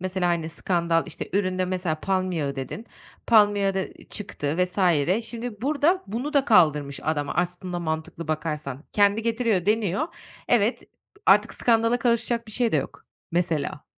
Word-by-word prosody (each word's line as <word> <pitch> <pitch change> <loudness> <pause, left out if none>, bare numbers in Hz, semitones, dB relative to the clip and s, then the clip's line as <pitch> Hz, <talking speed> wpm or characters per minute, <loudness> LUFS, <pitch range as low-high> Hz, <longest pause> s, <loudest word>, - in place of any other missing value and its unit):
mesela, 185 -1 -1
hani, 170 -2 0
skandal, 170 -1 0
işte, 165 - -7
üründe 185 -2 +1
mesela 180 -4 -2
palm 185 -1 0
yağı 140 -4 -2
dedin, 135 - -6 0.4
palm 210 -3 +5
yağı 195 -1 +1
da 190 - -5
çıktı 155 -7 -3
vs. 180 +2 -6 0.5
Şimdi 230 -2 -6
burada 305 +6 +2
bunu 245 +9 -4
da 280 -2 +3
kaldırmış 150 - +3
adam 145 -2 -1
aslında 180 +1 -2
mantıklı 160 0 -4
bakarsan. 150 -3 -3
Kendi 205 +1 +3
getiriyor, 225 -5 0
deniyor. 210 - +1 0.4
Evet, 235 0 +2 0.4
artık - - +5
skandala 230 0 +2
karışacak 235 -1 0
bir 215 - -9
şey 235 0 0
de - - +4
yok - - -4 0.3
mesela. 170 -4 -1
185 Hz, 150 wpm, -25 LUFS, 165-225 Hz, 0.5 s, palm